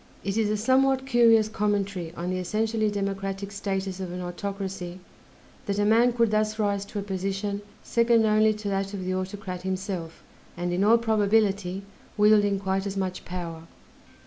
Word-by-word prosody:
It 195 0 -2
is 220 -2 +1
a 215 - +1
somewhat 265 +4 +3
curious 230 -4 +5
commentary 200 -5 -1
on 175 +2 -3
the 185 - -1
essentially 215 +3 0
democratic 195 -1 -3
status 195 -2 -3
of 185 -2 -4
an 180 - -5
autocracy 190 0 -5 0.7
that 200 0 -1
a 205 - +2
man 230 +3 +5
could 230 -2 +2
thus 215 0 +1
rise 200 -2 0
to 205 - -8
a 200 - -2
position 195 +1 -3 0.2
second 235 -1 +3
only 215 0 +4
to 210 -1 -6
that 195 +1 -2
of 185 -2 -5
the 185 - -1
autocrat 185 0 -4
himself; 185 -3 -4 0.3
and, 175 0 -2
in 185 +3 +1
all 225 +3 +6
probability, 205 -4 +1 0.3
wielding 205 -1 +4
quite 195 0 -1
as 195 0 -4
much 185 -1 -3
power. 165 -2 -6
200 Hz, 170 wpm, -26 LUFS, 190-215 Hz, 0.7 s, all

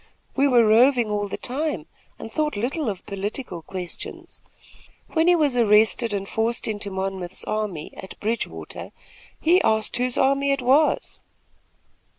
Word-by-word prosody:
We 280 +1 +4
were 240 -4 +5
roving 235 +1 +4
all 205 0 -1
the - - -5
time 260 - -2 0.3
and 225 - -8
thought 300 +3 -1
little 260 +5 -1
of 195 -3 -6
political 200 -1 -4
questions. 180 +1 -7 0.7
When 325 0 +2
he 355 - +6
was 295 -6 +2
arrested 225 0 +4
and 195 -1 -3
forced 225 +2 -1
into 205 -2 -3
Monmouth's 190 -1 -3
army, 210 -8 -3
at 190 - -10
Bridgewater, 225 +3 -4 0.5
he 355 +4 +4
asked 220 -1 +1
whose 250 0 0
army 275 +1 +2
it 275 -2 0
was." 275 +5 +2
225 Hz, 145 wpm, -24 LUFS, 205-275 Hz, 0.7 s, he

